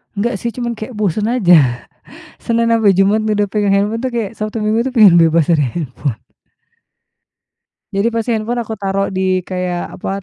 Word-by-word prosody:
Enggak 235 +4 -1
sih 235 - -3
cuman 235 -2 -4
kayak 220 +4 -7
bosan 210 -1 -1
aja. 170 - +4 0.6
Senin 230 0 +1
sampai 220 -3 +4
Jumat 205 +3 +3
udah 210 -1 0
pegang 205 0 0
handphone 210 +3 0
tuh, 260 - -2
kayak 230 -4 -3
Sabtu 215 +1 -4
minggu 215 +2 0
itu - - -10
pengen 215 -8 +6
bebas 165 -2 +3
dari 160 -4 +2
handphone. 140 -6 -4 1.8
Jadi 200 +4 +1
pasti 230 +1 -2
handphone 235 +2 -2
aku 220 - -5
taruh 195 0 -1
di 185 -1 0
kayak 180 -1 -4
apa, 180 - -6
205 Hz, 170 wpm, -16 LUFS, 185-225 Hz, 1.8 s, pengen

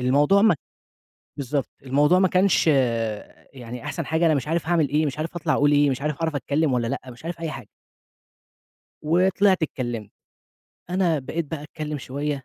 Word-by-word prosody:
الموضوع 145 +10 +3
ما 215 -8 +5 0.8
بالضبط 140 0 -2
الموضوع 145 +6 +3
ما 190 -1 +4
كانش 185 -2 +3
آآ، 115 -5 -2
يعني 125 -1 -9
أحسَن 150 - -4
حاجة، 160 +2 +1
أنا 155 - +4
مش 140 +1 -2
عارِف 165 0 -1
هاعمل 165 -4 +2
إيه، 150 +2 +1
مش 145 +2 -4
عارف 165 +3 -4
هاطلَع 165 - 0
أقول 145 +1 +3
إيه، 145 -1 +4
مش 130 +1 -3
عارف 150 0 -1
هاعرف 160 -2 -2
أتكلِّم 145 +2 0
والّا 120 -2 0
لأ، 135 +3 -2
مش 120 +5 -14
عارف 170 0 -5
أي 165 - -3
حاجة. 150 - -8 1.3
وطلِعت 185 +3 +3
اتكلّمت. 120 -8 -4 0.8
أنا 180 -4 +1
بقيت 160 +5 -3
بقى 155 -2 -4
أتكلّم 150 -1 -5
شوية 140 +1 -4
150 Hz, 180 wpm, -24 LUFS, 135-165 Hz, 1.3 s, ما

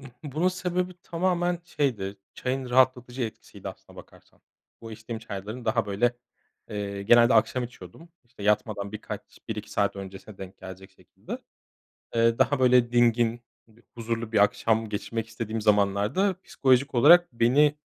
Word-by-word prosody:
ıhı, 135 - -11 0.2
bunun 155 +5 0
sebebi 180 0 -2
tamamen 175 0 0
şeydi, 120 - -2 0.2
çayın 130 0 -3
rahatlatıcı 125 0 +2
etkisiydi 110 -2 -7
aslına - - -13
bakarsan. - - -16 0.4
Bu 115 -1 -9
içtiğim 110 +1 -7
çayların 110 +2 -7
daha, 110 -2 +1
böyle, 120 +5 0 0.5
eee, 100 -1 -4
genelde 120 +4 +6
akşam 125 -1 +2
içiyordum, 120 - -12 0.2
işte, 120 -3 -14
yatmadan 105 -1 0
birkaç 110 - -6 0.3
1-2 - - -5
saat - - 0
öncesine 95 +1 -9
denk 95 -1 -10
gelecek 95 +1 -10
şekilde. 95 - -10 0.8
Eee, 115 0 +3
daha 145 -1 +3
böyle 125 -2 +4
dingin, 120 -1 +2 0.3
b 115 +1 -23
huzurlu 115 -1 -4
bir 110 - +2
akşam 110 0 +1
geçirmek 115 +2 -4
istediğim 115 -1 -4
zamanlarda 105 - +2
psikolojik 130 0 +2
olarak 175 +7 +6
beni, 140 +6 +4
115 Hz, 140 wpm, -26 LUFS, 105-130 Hz, 0.8 s, genelde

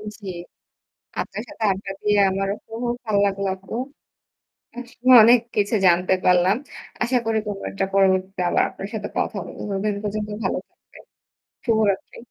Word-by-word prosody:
উম 210 - -7
জী। 195 - -6 0.9
আপনার 205 - -5
সাথে 225 - -7
আড্ডা 195 +1 -5
দিয়ে 210 -1 +2
আমারও 195 +1 -1
খুব 225 +1 -7 0.2
ভাল 215 -2 -1
লাগলো 200 0 -1
আপু। 190 +3 -9 1.0
আসলে 245 +1 -1
অনেক 240 +1 +7 0.2
কিছু 205 +2 +1
জানতে 180 +2 +3
পারলাম। 180 +2 +4 0.5
আশা 250 +1 +1
করি 225 -1 +1
কোনো 200 -1 -4
একটা 195 0 -1
পরিবর্তীতে 190 -1 +2
আবার - - +3
আপনার 195 - -7
সাথে 215 -2 -3
কথা 210 - -1
বলবো। - - -10
ততদিন 200 +1 -1
পর্যন্ত 210 0 -3
ভালো - - 0
থাকবেন। - - -19 0.6
শুভরাত্রি। 220 -4 +1
200 Hz, 150 wpm, -22 LUFS, 195-220 Hz, 1.0 s, অনেক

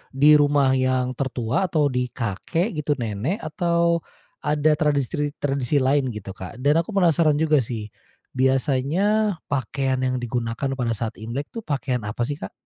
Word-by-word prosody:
di 150 +2 +7
rumah 145 -2 +3
yang 130 -1 +1
tertua 130 +5 0
atau 150 -5 +1
di 125 0 0
kakek 125 - -2
gitu, 145 0 0
nenek 115 - -2
atau 170 +2 +1 0.4
ada 150 +1 +2
tradistri 145 0 0
tradisi 140 -1 0
lain 135 +1 +2
gitu, 100 -2 -7
Kak? 95 +2 -9
Dan 145 +3 +4
aku 170 +5 -4
penasaran 165 -5 +4
juga 155 -1 +3
sih, 110 -4 -4 0.4
biasanya 150 +11 +1 0.2
pakaian 130 0 -1
yang 130 0 0
digunakan 120 +1 -2
pada 115 -2 0
saat 110 +1 -5
Imlek 120 +6 -5
tuh, 230 - -5
pakaian 135 - -2
apa 115 +3 -2
sih, 145 +4 -3
Kak? - - -7
140 Hz, 155 wpm, -23 LUFS, 125-150 Hz, 0.4 s, di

